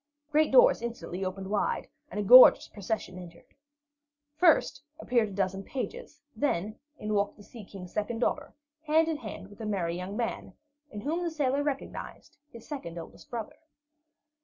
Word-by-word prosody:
Great 305 Hz, +1 st, +3 dB
doors -, -, +6 dB
instantly 230 Hz, -6 st, -5 dB
opened 190 Hz, +1 st, -4 dB
wide, 210 Hz, -, 0 dB, 0.2 s
and 210 Hz, -, -5 dB
a -, -, 0 dB
gorgeous 250 Hz, +5 st, +9 dB
procession 200 Hz, -3 st, -4 dB
entered. 170 Hz, -1 st, -12 dB, 0.9 s
First, 315 Hz, -4 st, +3 dB, 0.2 s
appeared 235 Hz, -7 st, +1 dB
a -, -, -9 dB
dozen 195 Hz, 0 st, -1 dB
pages; 300 Hz, -, -6 dB, 0.2 s
then, 215 Hz, -7 st, -1 dB, 0.2 s
in 215 Hz, 0 st, -3 dB
walked 200 Hz, 0 st, 0 dB
the 205 Hz, -, -14 dB
Sea 225 Hz, +1 st, -12 dB
King's 190 Hz, -2 st, -11 dB
second 215 Hz, +2 st, -2 dB
daughter, 285 Hz, +5 st, -2 dB, 0.3 s
hand 320 Hz, +2 st, +4 dB
in 320 Hz, -2 st, -1 dB
hand 215 Hz, -6 st, -8 dB
with 205 Hz, +2 st, -13 dB
a -, -, -4 dB
merry 175 Hz, -5 st, -1 dB
young 185 Hz, +3 st, -5 dB
man, 235 Hz, -1 st, -3 dB, 0.4 s
in 210 Hz, -5 st, -7 dB
whom 320 Hz, +8 st, -2 dB
the 345 Hz, -, -1 dB
sailor 285 Hz, -3 st, 0 dB
recognized 285 Hz, -2 st, -5 dB
his 230 Hz, -4 st, -13 dB
second 265 Hz, -, -6 dB
oldest 165 Hz, -, -11 dB
brother. 230 Hz, -3 st, -6 dB
220 Hz, 165 wpm, -29 LUFS, 195-285 Hz, 0.9 s, gorgeous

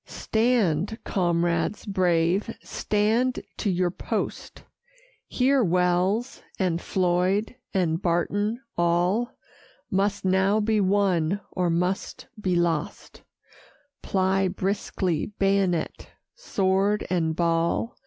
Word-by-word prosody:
"Stand, 220 Hz, -5 st, 0 dB
comrades 170 Hz, 0 st, 0 dB
brave, 180 Hz, 0 st, +1 dB
stand 220 Hz, +5 st, 0 dB, 0.2 s
to 210 Hz, -, -1 dB
your 180 Hz, -1 st, +1 dB
post: -, -, -4 dB, 0.6 s
Here 265 Hz, 0 st, +2 dB
Wells, 180 Hz, +6 st, +1 dB, 0.2 s
and 175 Hz, -3 st, 0 dB
Floyd, 185 Hz, +5 st, 0 dB, 0.2 s
and 175 Hz, -3 st, 0 dB
Barton; 205 Hz, +7 st, 0 dB
all 175 Hz, +7 st, +1 dB, 0.6 s
Must 200 Hz, +1 st, 0 dB
now 190 Hz, +3 st, +3 dB
be 215 Hz, 0 st, +1 dB
won, 190 Hz, -2 st, +2 dB
or 180 Hz, -2 st, 0 dB
must 180 Hz, +8 st, -2 dB, 0.2 s
be 185 Hz, -3 st, 0 dB
lost; 170 Hz, -3 st, -2 dB, 0.8 s
Ply 190 Hz, 0 st, +1 dB
briskly, 185 Hz, -2 st, -2 dB
bayonet, 195 Hz, -4 st, 0 dB, 0.2 s
sword, 200 Hz, -, 0 dB
and 160 Hz, -3 st, +1 dB
ball." 170 Hz, +6 st, 0 dB
190 Hz, 95 wpm, -25 LUFS, 175-205 Hz, 0.8 s, now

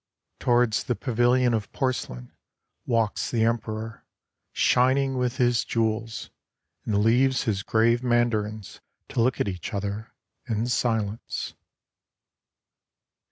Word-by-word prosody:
Towards 120 Hz, -3 st, +2 dB
the 125 Hz, -, 0 dB
pavilion 125 Hz, 0 st, +2 dB
of 110 Hz, -2 st, -2 dB
porcelain 95 Hz, -, -3 dB, 0.6 s
walks 115 Hz, -4 st, 0 dB
the 115 Hz, -2 st, +1 dB
Emperor, 110 Hz, -1 st, -2 dB, 0.5 s
shining 130 Hz, +2 st, +3 dB
with 125 Hz, -1 st, -1 dB
his 120 Hz, -2 st, +2 dB
jewels 110 Hz, 0 st, -1 dB
j -, -, -16 dB, 0.5 s
and 105 Hz, -2 st, +1 dB
leaves 130 Hz, +4 st, +3 dB
his 100 Hz, -4 st, -1 dB
grave 115 Hz, +3 st, +2 dB
Mandarins 110 Hz, -4 st, -1 dB, 0.3 s
to -, -, 0 dB
look 125 Hz, +2 st, +1 dB
at -, -, +1 dB
each 90 Hz, 0 st, -4 dB
other 100 Hz, +2 st, -4 dB, 0.3 s
in 115 Hz, 0 st, -1 dB
silence. 110 Hz, -3 st, -1 dB
115 Hz, 115 wpm, -26 LUFS, 110-125 Hz, 0.6 s, shining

